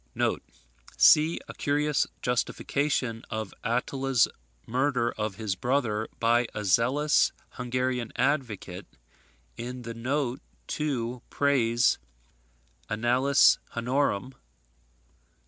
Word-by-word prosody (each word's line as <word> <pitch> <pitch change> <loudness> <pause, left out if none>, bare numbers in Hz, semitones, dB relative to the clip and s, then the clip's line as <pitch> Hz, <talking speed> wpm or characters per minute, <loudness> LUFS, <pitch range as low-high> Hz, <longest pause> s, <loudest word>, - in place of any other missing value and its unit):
[See 150 - +6
a - - -8
curious 145 0 +1 0.2
justification 125 -1 -1
of 110 -2 -4
Attila's 125 +1 +1 0.4
murder 125 -1 +1
of 105 -2 -3
his 105 -2 -2
brother, 110 -1 0
by 120 +1 +3
a 105 - -3
zealous 130 +10 +3 0.2
Hungarian 125 -1 -2
advocate, 125 -9 -1 0.7
in 125 +1 -6
the 115 0 -6
note 130 +2 -2 0.3
to 125 -5 -2
Pray's 125 -4 +2 0.9
"Annales 125 +5 +4 0.2
Hunnorum," 125 -1 0
p. - - -25
125 Hz, 90 wpm, -27 LUFS, 115-135 Hz, 0.9 s, See